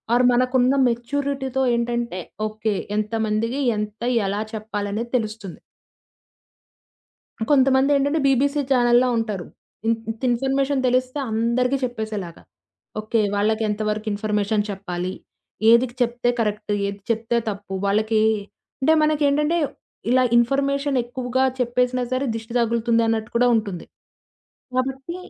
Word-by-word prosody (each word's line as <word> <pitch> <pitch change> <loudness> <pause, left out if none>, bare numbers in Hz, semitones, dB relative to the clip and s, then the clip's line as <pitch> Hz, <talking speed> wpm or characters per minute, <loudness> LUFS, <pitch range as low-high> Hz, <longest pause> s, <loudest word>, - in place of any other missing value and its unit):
Are 250 +1 +4
మనకున్న 255 +1 +3
మెచ్యూరిటీతో 265 +2 -1
ఏంటంటే, 235 -5 -2 0.3
okay. 215 0 -2 0.2
ఎంతమందికి, 220 +4 -1 0.2
ఎంత, 210 +1 -5 0.3
ఎలా 200 +2 -1
చెప్పాలనేది 215 +1 -4
తెలుస్తుంది. 215 -5 -6 1.9
కొంతమందేంటంటే, 275 +2 +3
బీబీసీ 280 +2 +2
ఛానెల్‌లా 245 -1 +4
ఉంటారు. 210 -5 -2 0.4
ఇ - - +4 0.2
ఇంత 225 - -12
ఇన్‌ఫర్మేషన్ 270 +3 +1
తెలిస్తే 255 +3 0
అందరికి 235 +4 +1
చెప్పేసేలాగా. 215 -8 -4 0.6
ఓకే. 220 +2 0 0.2
వాళ్ళకేంతవరకు 215 0 0
ఇన్‌ఫర్మేషన్ 210 0 0
చెప్పాలి? 185 -2 -4 0.6
ఏదికి 235 +1 +4
చెప్తే 245 0 +1
కరెక్ట్? 210 -1 -1 0.2
ఏది 200 0 -5
చెప్తే 230 +1 0
తప్పు? 200 -1 -6
వాళ్ళకి 215 +2 +2 0.6
అంటే 315 +4 +4
మనకేంటంటే 300 +1 +2 0.5
ఇలా 255 +1 +4
ఇన్‌ఫర్మేషన్ 275 +3 +1
ఎక్కువగా 250 +1 -1 0.2
చెప్పేసినా 250 +1 +1
సరే 260 +2 0
దిష్టి 225 +1 -7
తగులుతుందన్నట్టు 230 -1 +1
కూడా 245 +1 +4
ఉంటుంది. 200 -6 -3 0.9
కాబట్టి 265 +5 -2
235 Hz, 100 wpm, -22 LUFS, 215-260 Hz, 1.9 s, Are